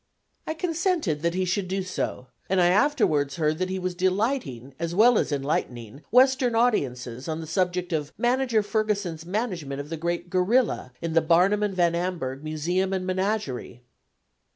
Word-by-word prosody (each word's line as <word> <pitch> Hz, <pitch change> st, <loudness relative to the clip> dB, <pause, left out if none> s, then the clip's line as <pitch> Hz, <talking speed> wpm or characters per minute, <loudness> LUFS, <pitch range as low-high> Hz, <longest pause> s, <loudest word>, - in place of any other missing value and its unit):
I 315 Hz, -, -2 dB
consented 330 Hz, -, -1 dB
that 170 Hz, +1 st, 0 dB
he 185 Hz, 0 st, 0 dB
should 185 Hz, +1 st, -1 dB
do 190 Hz, +1 st, -2 dB
so, 185 Hz, -8 st, -3 dB, 0.2 s
and 190 Hz, 0 st, +2 dB
I 175 Hz, -1 st, +5 dB
afterwards 180 Hz, -, +2 dB
heard 155 Hz, 0 st, 0 dB
that 185 Hz, 0 st, -1 dB
he 190 Hz, -, -2 dB
was 185 Hz, -1 st, -2 dB
delighting 185 Hz, -, -1 dB
as 170 Hz, +1 st, -3 dB
well 235 Hz, +4 st, +6 dB
as -, -, -1 dB
enlightening 135 Hz, -3 st, -3 dB
western 255 Hz, 0 st, +4 dB
audiences 130 Hz, -, 0 dB
on 160 Hz, 0 st, -3 dB
the 165 Hz, -, -6 dB
subject 180 Hz, +1 st, -1 dB
of 150 Hz, -2 st, -2 dB
Manager 245 Hz, -3 st, +2 dB
Ferguson's 205 Hz, -6 st, -2 dB
management 180 Hz, -, -3 dB
of 145 Hz, +1 st, -6 dB
the 165 Hz, -, -4 dB
great 170 Hz, +2 st, -2 dB
"gorilla" 190 Hz, -, +1 dB
in 165 Hz, -1 st, -2 dB
the 165 Hz, -, +4 dB
Barnum 180 Hz, +6 st, +3 dB
and 205 Hz, -2 st, -1 dB
Van 175 Hz, -2 st, +3 dB
Amburgh 170 Hz, -6 st, -3 dB
Museum 175 Hz, +5 st, -1 dB
and 185 Hz, -1 st, -2 dB
Menagerie. 185 Hz, -, -2 dB
180 Hz, 170 wpm, -25 LUFS, 155-210 Hz, 0.2 s, well